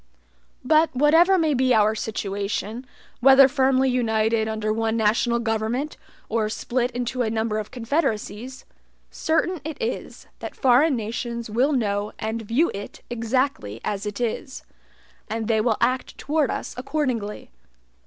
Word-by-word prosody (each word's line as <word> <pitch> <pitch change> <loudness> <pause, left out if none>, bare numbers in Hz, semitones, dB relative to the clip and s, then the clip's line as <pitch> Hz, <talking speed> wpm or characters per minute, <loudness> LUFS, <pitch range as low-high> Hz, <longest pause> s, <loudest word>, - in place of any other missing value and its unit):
But 315 +4 +4
whatever 325 +8 +5
may 320 -3 +2
be 255 -1 +3
our 215 0 +4
situation, 215 +2 -3 0.3
whether 270 +1 +8
firmly 265 -1 +2
united 220 -3 +1
under 215 -1 -1
one 225 0 0
national 230 +2 +2
government, 230 +5 -2 0.3
or 220 -1 0
split 245 +2 -1
into 245 +1 -3
a 225 - +1
number 220 -1 -1
of 210 - -6
confederacies, 250 -1 -3 0.5
certain 325 +1 0
it 310 -1 -5
is, 460 - -4
that - - -7
foreign 270 +3 +4
nations 235 0 -4
will 255 +7 +2
know 205 -4 -1
and 220 +1 -3
view 235 +10 +1
it 200 +1 -8
exactly 230 - -1
as 205 0 -3
it 205 +2 -5
is; 245 +3 -3 0.7
and 220 0 -3
they 220 -2 +2
will 220 -1 +1
act 255 0 0
toward 300 -1 0
us - - -4
accordingly. 255 - -3
235 Hz, 140 wpm, -24 LUFS, 220-265 Hz, 0.7 s, whether